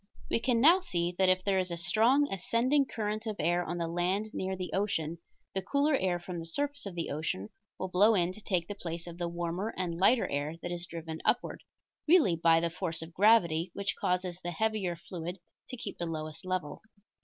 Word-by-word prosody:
We - - +3
can 240 0 +2
now 330 +9 +7
see 175 - -2
that 190 -1 +5
if 185 0 +2
there 195 -1 +2
is 185 0 -1
a 170 - -4
strong 230 +11 +3
ascending 250 +9 +2
current 215 0 -3
of 215 - -2
air 175 +3 +1
on 175 +1 -4
the 170 -1 -1
land 185 +6 -1
near 190 0 -2
the 185 -1 -5
ocean 170 -5 -1 0.3
the 190 - -1
cooler 280 +9 +1
air 185 -9 +1
from 175 0 -6
the 165 - -7
surface 285 +6 -2
of 190 - -7
the 170 - -3
ocean 145 - -3 0.3
will 190 - -3
flow 205 +5 +5
in 175 -2 +2
to 215 - -11
take 180 -5 -1
the - - -4
place 170 -4 -5
of 170 0 -9
the 175 - -1
warmer 175 +5 -3
and 175 -2 -2
lighter 230 +5 +4
air 145 +3 -2
that 175 - -3
is 175 0 -4
driven 160 -1 -6
upward, 245 - 0 0.5
really 310 - +5
by 165 0 +4
the 170 0 -1
force 165 -2 -3
of 165 +1 -11
gravity 180 -4 +4
which 200 -1 -2
causes 180 -1 -1
the 175 - -4
heavier 195 0 -1
fluid 175 +1 -6 0.3
to 255 - -6
keep 240 - -7
the 170 - -2
lowest 155 +1 -5
level. 185 -5 -3
180 Hz, 215 wpm, -31 LUFS, 170-215 Hz, 0.5 s, now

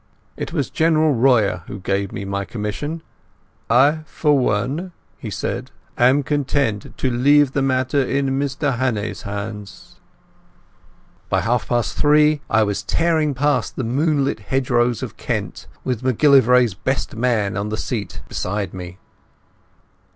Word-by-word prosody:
It - - -5
was 145 -6 -2
General 160 -2 +3
Royer 115 -7 +3
who 100 - -7
gave 100 +1 -1
me 100 - -5
my 100 0 -2
commission. 120 +11 -5 0.7
"I 140 +7 +4
for 150 -2 +1
one," 135 - -1 0.3
he - - -6
said, - - -4 0.3
"am 130 +4 +4
content 140 -6 -1
to 130 - 0
leave 140 +3 +4
the 135 - 0
matter 130 +1 +1
in 135 +1 0
Mr 140 -2 -1
Hannay's 115 -6 -1
hands." 100 -1 -7 1.3
By - - +1
half 120 0 0
past 120 -3 0
three 150 0 +4
I 110 0 +4
was 105 -2 -1
tearing 160 -4 +1
past 145 +2 0
the 130 - -3
moonlit 140 +2 0
hedgerows 120 0 0
of - - -7
Kent, - - -4 0.2
with 125 -4 -2
MacGillivray's 125 -3 +4
best 130 +6 -3
man 110 -5 0
on 100 +1 -2
the 110 - -3
seat 110 -6 -4
beside 100 -1 -3
me. 90 -1 -8
125 Hz, 135 wpm, -20 LUFS, 105-145 Hz, 1.3 s, I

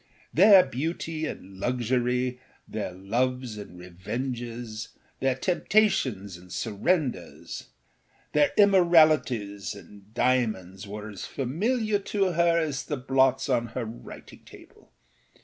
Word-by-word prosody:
Their 195 +2 +8
beauty 155 +4 -3
and 95 -6 -9
luxury, 125 +2 0 0.3
their 105 -4 -4
loves 120 +6 -2
and 100 -4 -10
revenges, 115 +5 -5 0.3
their 135 -1 +1
temptations 135 - +1
and 90 0 -16
surrenders, 125 - -2 0.7
their 150 -1 +4
immoralities 155 - +4
and 100 0 -15
diamonds 110 -6 0
were 105 +1 -7
as 100 - -7
familiar 210 - 0
to 195 -1 0
her 170 0 +3
as 155 -4 -1
the 145 - -3
blots 135 +1 +2
on 120 -3 +1
her 125 - -1
writing 110 +2 -11
table. - - -17
125 Hz, 110 wpm, -27 LUFS, 105-160 Hz, 0.7 s, Their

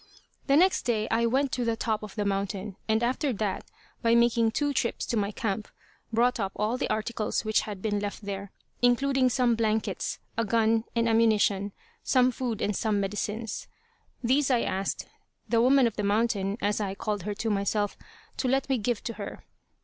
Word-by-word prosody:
The 275 - +4
next 370 +3 +4
day 220 -3 0
I 230 +1 +3
went 265 +3 +1
to 250 - -1
the 230 -1 +1
top 220 -1 -1
of 210 -2 -9
the 210 -2 -1
mountain, 200 0 -2
and 220 +1 +2
after 260 +4 +1
that, 205 -2 -3 0.3
by 230 0 +4
making 235 -1 +4
two 290 +5 0
trips 235 -2 -1
to - - -2
my 200 -2 +1
camp, 215 -1 -3 0.4
brought 240 +2 +2
up 195 -2 -2
all 215 +3 0
the - - -2
articles 215 0 -1
which 215 0 +3
had 200 -3 -7
been 205 -2 0
left 205 0 -5
there, 200 -1 -5 0.3
including 255 +2 +3
some 245 -1 +2
blankets 220 -1 -1 0.2
a - - +3
gun 225 +1 +2
and 230 0 +2
ammunition, 215 -3 +3 0.3
some 255 -1 +4
food 240 -3 -3
and 205 - 0
some 215 0 +1
medicines. 210 +3 -3 0.6
These 270 +4 +3
I 245 -3 +3
asked 195 +1 -2 0.4
"the 230 -1 +3
woman 265 +1 +5
of 230 -2 -1
the 210 - -1
mountain," 205 -1 +1
as 205 +1 0
I 195 -1 -2
called 205 0 -2
her 205 +3 -4
to 225 +2 -1
myself, 205 0 0 0.4
to 260 - 0
let 270 +2 +1
me 265 -3 +2
give 225 +1 -1
to 230 - -3
her. 200 - -7
225 Hz, 190 wpm, -28 LUFS, 205-240 Hz, 0.6 s, woman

